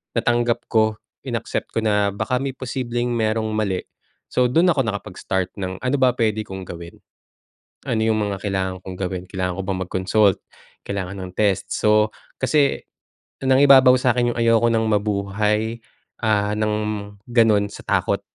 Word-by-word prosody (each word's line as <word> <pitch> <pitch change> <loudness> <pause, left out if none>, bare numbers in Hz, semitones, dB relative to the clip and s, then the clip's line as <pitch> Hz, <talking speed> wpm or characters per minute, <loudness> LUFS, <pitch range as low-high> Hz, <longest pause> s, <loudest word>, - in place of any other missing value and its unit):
natanggap 120 0 +1
ko, 110 -1 +2 0.3
inaccept - - -3
ko 115 - 0
na 105 -2 +1
baka 125 +5 -1
may 135 0 -3
posibleng 120 -2 -3
merong 110 0 0
mali. 105 -4 -1 0.5
So, 125 - +2
dun 165 +9 +3
ako 140 -7 +2
nakapag-start 95 -2 -3
ng 95 -1 -5
ano 130 +2 0
ba 130 -1 +4
pwede 110 -3 0
kong 95 0 -7
gawin? 85 0 -10 0.9
Ano 110 -2 0
yung 110 -1 +2
mga 100 -2 -3
kailangan 95 -2 -1
kong 95 - -7
gawin? 90 -1 -3
Kailangan 90 -1 -3
ko - - -2
bang 95 -1 -2
mag-consult? 95 +2 +2 0.5
Kailangan 100 -1 -4
ng 90 - -7
test? 100 -1 0
So 105 0 +3 0.3
kasi 140 +2 +2 0.6
nangibabaw 130 -1 +7
sakin 120 -1 +2
yung - - -9
ayoko 115 0 +4
nang 115 -1 +1
mabuhay, 105 +2 0 0.4
ah, 105 -2 +2
ng 105 0 0 0.5
ganun 115 -4 +3
sa - - -10
takot. - - +1
110 Hz, 150 wpm, -22 LUFS, 100-120 Hz, 0.9 s, nangibabaw